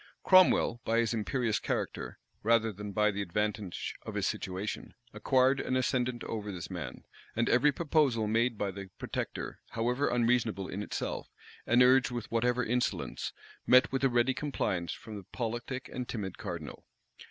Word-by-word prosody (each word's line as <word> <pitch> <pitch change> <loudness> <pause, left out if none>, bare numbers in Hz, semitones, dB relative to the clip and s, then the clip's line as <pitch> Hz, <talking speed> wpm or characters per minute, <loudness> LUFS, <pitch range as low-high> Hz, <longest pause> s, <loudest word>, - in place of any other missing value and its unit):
Cromwell, 185 -10 +5
by 115 - +1
his 115 0 +2
imperious 115 0 0
character, - - -3 0.2
rather 115 0 +3
than 105 +1 -6
by 105 +1 +3
the 100 0 -3
advantage 105 0 -2
of - - -7
his - - 0
situation, 95 +3 -3 0.2
acquired 130 +5 +3
an 130 - -1
ascendant 125 -1 0
over 105 -2 -4
this 90 -1 -7
man; 80 -9 -6 0.3
and 115 +1 +1
every 125 +5 +5
proposal 145 -7 +2
made 115 +2 +1
by 100 -1 -1
the 95 0 -8
protector, - - -4
however 125 +5 +1
unreasonable 115 -5 +1
in 100 - -4
itself, - - -4 0.4
and 120 +2 +6
urged 130 +1 +5
with 120 -2 -5
whatever 120 +2 +2
insolence, 125 +2 -1 0.4
met 130 +1 +6
with 135 +1 -1
a 135 - +5
ready 120 +2 +3
compliance 95 - -2
from 110 -2 -8
the 100 - -8
politic 120 +2 -3
and 125 -1 -4
timid 95 -5 -4
cardinal. 85 -9 -6
115 Hz, 160 wpm, -31 LUFS, 105-125 Hz, 0.4 s, and